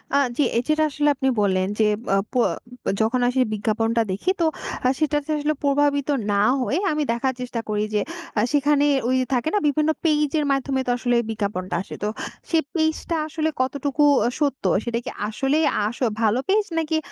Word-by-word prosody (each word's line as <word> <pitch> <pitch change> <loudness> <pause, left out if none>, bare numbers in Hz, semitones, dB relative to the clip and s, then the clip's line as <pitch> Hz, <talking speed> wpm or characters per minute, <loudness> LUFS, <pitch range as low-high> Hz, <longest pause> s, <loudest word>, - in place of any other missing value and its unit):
আ - - +6 0.2
জ্বি, 290 - +2
এ - - +4
যেটা 310 0 +2
আসলে 295 0 +1
আপনি 265 0 0
বললেন 185 -2 +1
যে, 220 - +5 0.3
আ - - +3 0.2
প - - -16 0.7
যখন 225 +3 +1
আসে 255 +1 +1
বিজ্ঞাপনটা 225 +2 0
দেখি 205 - 0
তো - - +4 0.4
আ - - +4
সেটাতে 295 -1 0
আসলে 300 +1 0
প্রভাবিত 285 0 +2 0.2
না 200 0 +2 0.2
হয়ে 280 +6 0
আমি 305 0 0
দেখার 260 +3 0
চেষ্টা 245 -1 -4
করি 210 0 0
যে, 210 - +2 0.4
আ - - +4
সেখানে 290 0 +3 0.2
ওই 255 - +2 0.2
থাকে 250 +4 +1
না - - +4
বিভিন্ন 300 +2 +1 0.2
পেইজের 300 -1 +2
মাধ্যমে 275 -1 0
তো - - +2
আসলে 245 -1 0
বিজ্ঞাপনটা 200 -4 -3
আসে। - - -8
তো 210 - +1 0.4
সেই 325 -1 +3
পেইজ 315 -1 +2
টা 335 - +1
আসলে 315 0 -1
কতটুকু 280 +2 0 0.2
অ - - +3
সত্য? 285 -3 0 0.2
সেটা 235 -1 -2
কি - - -3 0.2
আসলেই 270 +8 +1 0.2
আসো 240 +3 -2 0.2
ভালো 225 +2 +3
পেজ 420 +2 +4
নাকি 320 0 0
275 Hz, 185 wpm, -23 LUFS, 230-300 Hz, 0.7 s, আ